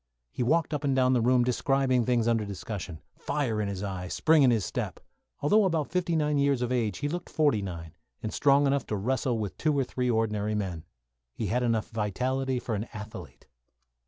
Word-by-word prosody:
He - - -5
walked 160 +6 +2
up 150 0 -2
and 135 -2 +1
down 130 0 +3
the 125 - +3
room 125 +1 +4
describing 130 0 +1
things 120 -2 +2
under 115 -2 +2
discussion; 100 -4 -6
fire 130 -7 -1
in 105 - -1
his 100 -1 -4
eye, 95 -2 -4
spring 155 - +3
in 135 - +6
his 110 -6 +2
step. - - -4 0.4
Although 210 +9 +4
about 165 -6 0
fifty 175 -1 0
nine 150 -2 +1
years 140 -3 +2
of 125 - -2
age, 110 -7 0
he 145 - -2
looked 175 +3 -4
forty 145 -10 +2
five, 85 -4 -6 0.3
and 110 - -3
strong 140 0 +4
enough 140 -1 +1
to 105 - -2
wrestle 125 +3 0
with 105 -3 -4
two 155 -2 +1
or 135 - +3
three 125 0 -2
ordinary 105 -2 0
men. 90 -6 -3 0.5
He 110 - -3
had 125 - +1
enough 115 -3 0
vitality 130 +5 -1
for 120 -2 -3
an 105 +1 -2
athlete. 105 0 -9
125 Hz, 205 wpm, -28 LUFS, 105-140 Hz, 0.5 s, in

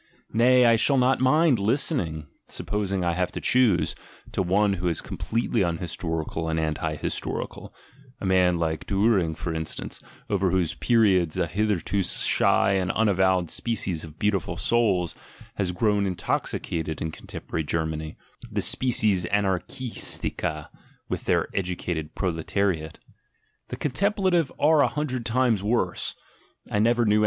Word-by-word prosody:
— - - -33
nay, 125 +2 +5
I 115 -1 +5
shall 135 +5 +3
not 130 +1 +3
nind 135 -1 +4
listening 100 - 0 0.2
(supposing 100 -3 -2
I 85 - +1
have 90 +1 -1
to - - -4
choose) 120 -9 +3 0.4
to - - -1
one 100 +3 +2
who 90 -2 -1
3 80 - -5
completely 115 -1 -1
unhistorical 80 -2 -2
and 80 0 0
anti 80 0 -2
historical - - -4 0.5
(a - - -5
man, 90 -2 +3
like 80 -2 -2
)uhring 95 -5 +2
for 85 0 -3
instance, 80 -1 -4 0.3
over 95 -2 +1
whose 90 -3 +1
periods 95 -9 +2
a 90 - +2
hitherto 100 +1 0
shy 95 +1 +3
,nd 90 - -1
unavowed 95 -5 +2
species 95 -8 -1
of 80 -1 -11
"beautiful 100 -3 -1
souls" 100 -8 +1 0.4
has 95 -3 0
grown 100 +1 +1
in 90 -2 -3
oxicated 80 -2 -2
in 80 - -3
contemporary 80 - -5
Germany, 80 0 -3 0.3
the - - -1
species 105 -8 +2
anarchis 105 +6 -1
ica 75 -1 -4 0.4
within - - +1
the - - -3
educated 85 -4 -4
proletariate). 85 -2 -1 0.7
The - - -6
"contempla 190 - 0
ive" 165 -6 +2
are 150 0 +5
a - - +4
hundred 130 -6 -3
times 120 -3 +2
worse 110 +4 -1 0.3
— - - -27
I 105 - +1
never 120 +2 +3
knew 105 0 +3
anything - - +3
95 Hz, 145 wpm, -25 LUFS, 85-115 Hz, 0.7 s, nay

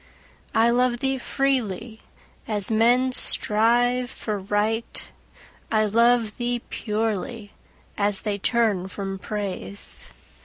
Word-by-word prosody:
I 230 +1 +4
love 245 0 +2
thee 265 +1 -1
freely, 235 -5 -2 0.5
as 210 -1 -1
men 240 +4 +3
strive 245 +2 +3
for 215 -5 -4
Right; 210 +3 -1 0.6
I 215 -1 +3
love 230 +1 +2
thee 240 -1 -2
purely, 215 0 -3 0.5
as 205 -1 +1
they 205 -2 -2
turn 210 -4 +1
from 195 0 -5
Praise. 190 - -6
225 Hz, 105 wpm, -24 LUFS, 205-240 Hz, 0.6 s, I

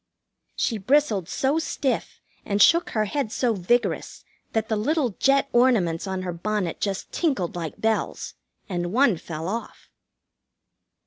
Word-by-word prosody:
She 225 -3 -1
bristled 215 - +2
so 275 +4 +1
stiff 280 -4 -2 0.2
and 200 0 -1
shook 335 +8 +5
her 215 -1 0
head 225 +1 -2
so 240 -1 +1
vigorous 225 +5 -1 0.3
that 220 -1 0
the 220 - 0
little 265 +4 +1
jet 275 0 +3
ornaments 210 -9 +3
on 190 -1 -3
her 180 -1 -3
bonnet 185 0 -2
just 200 -1 -2
tinkled 265 - -1
like 165 -3 -5
bells, 220 0 -1 0.3
and 175 -2 -3
one 240 -4 +3
fell 160 0 -6
off. 230 +5 -6
215 Hz, 140 wpm, -24 LUFS, 185-260 Hz, 0.3 s, shook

